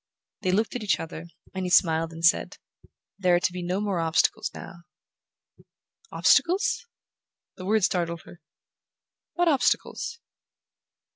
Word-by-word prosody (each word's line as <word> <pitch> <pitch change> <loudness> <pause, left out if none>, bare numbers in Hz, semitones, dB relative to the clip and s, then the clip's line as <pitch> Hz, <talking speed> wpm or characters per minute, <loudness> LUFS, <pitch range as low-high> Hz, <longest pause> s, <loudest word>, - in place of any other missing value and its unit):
They 185 - -1
looked 220 +6 0
at 245 - -3
each 210 - +1
other, 165 +1 -7 0.3
and 190 -1 -3
he 180 - -2
smiled 165 -2 +3
and 165 0 -3
said: 175 - +2 0.6
"There 180 -2 +3
are - - +3
to 175 - -1
be 180 - -5
no 180 +2 -2
more 200 -4 -1
obstacles 165 +2 +1
now." 185 - -10 1.3
"Obstacles?" 370 +6 +2 0.7
The 185 - -8
word 215 +1 +2
startled 170 -2 0
her. 175 - -15 0.9
"What 350 0 +1
obstacles?" 315 - 0
185 Hz, 135 wpm, -26 LUFS, 170-210 Hz, 1.3 s, smiled